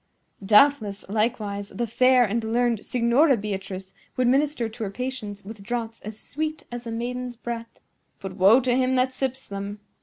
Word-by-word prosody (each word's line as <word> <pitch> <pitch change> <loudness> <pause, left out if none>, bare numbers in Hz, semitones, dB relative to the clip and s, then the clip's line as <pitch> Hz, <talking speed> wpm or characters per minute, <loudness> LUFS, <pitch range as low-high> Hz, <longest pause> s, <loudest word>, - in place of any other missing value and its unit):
Doubtless, 215 -1 +4
likewise, 210 -2 -1
the 240 - -3
fair 255 +2 +4
and 225 +2 -1
learned 230 0 +1
Signora 250 +4 +3
Beatrice 195 -2 -5 0.2
would 255 -1 +2
minister 275 -1 +2
to 225 +1 -7
her 205 - -2
patients 215 -3 -5
with 215 0 -9
draughts 230 +1 -4
as 215 +1 -7
sweet 310 +2 -4
as 240 0 -6
a - - -4
maiden's 245 +2 -4
breath; 230 0 -6 0.4
but 195 -1 -6
woe 200 +6 +6
to 245 -1 +1
him 260 0 +2
that 255 0 +2
sips 265 0 -2
them!" 200 +1 -6
235 Hz, 170 wpm, -25 LUFS, 210-255 Hz, 0.4 s, woe